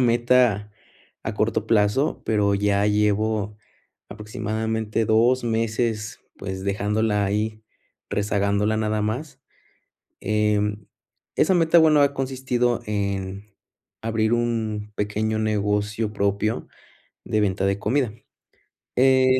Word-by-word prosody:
meta 120 Hz, -3 st, +3 dB, 0.5 s
a -, -, -4 dB
corto -, -, 0 dB
plazo, 110 Hz, +7 st, +2 dB
pero 105 Hz, -2 st, +2 dB
ya 100 Hz, 0 st, +1 dB
llevo 105 Hz, 0 st, +1 dB, 0.5 s
aproximadamente 110 Hz, 0 st, -2 dB
2 120 Hz, +4 st, +3 dB
meses, 110 Hz, -1 st, -1 dB, 0.2 s
pues, 95 Hz, -1 st, -6 dB
dejándola 105 Hz, +1 st, 0 dB
ahí, 110 Hz, +2 st, -2 dB, 0.5 s
rezagándola, 105 Hz, +1 st, +1 dB
nada 110 Hz, -1 st, 0 dB
más. 130 Hz, +6 st, -4 dB, 0.8 s
Em, 105 Hz, -1 st, 0 dB, 0.5 s
esa 190 Hz, -, +3 dB
meta, 165 Hz, -1 st, +4 dB
bueno, 155 Hz, -2 st, +5 dB
ha 140 Hz, 0 st, +3 dB
consistido 130 Hz, -3 st, -1 dB
en 100 Hz, -1 st, -3 dB, 0.6 s
abrir 110 Hz, 0 st, 0 dB
un 110 Hz, -3 st, -1 dB
pequeño 105 Hz, +1 st, -1 dB
negocio 105 Hz, 0 st, 0 dB
propio 100 Hz, +2 st, -1 dB, 0.6 s
de 110 Hz, -, 0 dB
venta 95 Hz, -1 st, +1 dB
de 100 Hz, 0 st, 0 dB
comida. 120 Hz, +2 st, 0 dB, 0.8 s
Eh, 130 Hz, 0 st, +5 dB
110 Hz, 100 wpm, -23 LUFS, 105-115 Hz, 0.8 s, bueno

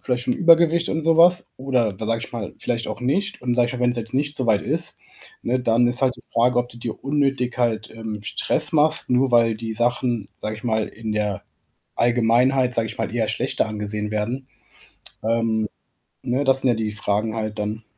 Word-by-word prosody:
vielleicht 125 Hz, -1 st, -1 dB
schon 125 Hz, -, +1 dB
Übergewicht 170 Hz, 0 st, +4 dB
und 160 Hz, 0 st, -1 dB
so 165 Hz, 0 st, +3 dB
was? 175 Hz, +1 st, +5 dB
Oder 125 Hz, -7 st, 0 dB
wa 110 Hz, -, -4 dB
sage 115 Hz, 0 st, 0 dB
ich -, -, -12 dB
mal, 115 Hz, -4 st, -5 dB
vielleicht 115 Hz, -2 st, -2 dB
auch -, -, -5 dB
nicht? 190 Hz, +11 st, -1 dB
Und, 125 Hz, -1 st, 0 dB
sage 120 Hz, -1 st, +3 dB
ich -, -, -3 dB
mal, 125 Hz, -, -5 dB
wenn's 125 Hz, 0 st, +2 dB
jetzt 115 Hz, -1 st, -5 dB
nicht 145 Hz, +2 st, 0 dB
so 130 Hz, -, -1 dB
weit 105 Hz, -3 st, +3 dB
ist, 165 Hz, +5 st, -2 dB, 0.4 s
ne, 130 Hz, -, 0 dB
dann 120 Hz, 0 st, +3 dB
ist 125 Hz, +2 st, +2 dB
halt 130 Hz, -1 st, +3 dB
die -, -, -14 dB
Frage, 120 Hz, +2 st, +3 dB
ob 120 Hz, 0 st, 0 dB
du 120 Hz, -, -13 dB
dir 115 Hz, -2 st, -6 dB
unnötig 135 Hz, -3 st, 0 dB
halt, 115 Hz, -3 st, 0 dB
ähm, 110 Hz, -2 st, -6 dB
Stress 105 Hz, -, -1 dB
machst, 155 Hz, 0 st, +2 dB
nur 125 Hz, +1 st, +2 dB
weil 115 Hz, -2 st, +4 dB
die 115 Hz, +1 st, -5 dB
Sachen, 120 Hz, -2 st, 0 dB
sage 110 Hz, 0 st, -3 dB
ich 110 Hz, -, -13 dB
mal, 110 Hz, -2 st, 0 dB
in 110 Hz, 0 st, -5 dB
der 105 Hz, -3 st, -1 dB, 0.5 s
Allgemeinheit, 120 Hz, +2 st, +3 dB
sage 115 Hz, -1 st, 0 dB
ich -, -, -8 dB
mal, 115 Hz, 0 st, -3 dB
eher 115 Hz, -3 st, 0 dB
schlechter -, -, 0 dB
angesehen 105 Hz, 0 st, -4 dB
werden. 115 Hz, +5 st, -3 dB, 0.8 s
Ähm, 110 Hz, -1 st, 0 dB, 0.5 s
ne, 125 Hz, +3 st, 0 dB
das 135 Hz, -1 st, +3 dB
sind 130 Hz, -, +2 dB
ja 120 Hz, -, +4 dB
die 110 Hz, -1 st, -2 dB
Fragen 105 Hz, +1 st, -1 dB
halt 110 Hz, -1 st, -3 dB
dann. 105 Hz, +2 st, -3 dB
120 Hz, 215 wpm, -22 LUFS, 110-130 Hz, 0.8 s, was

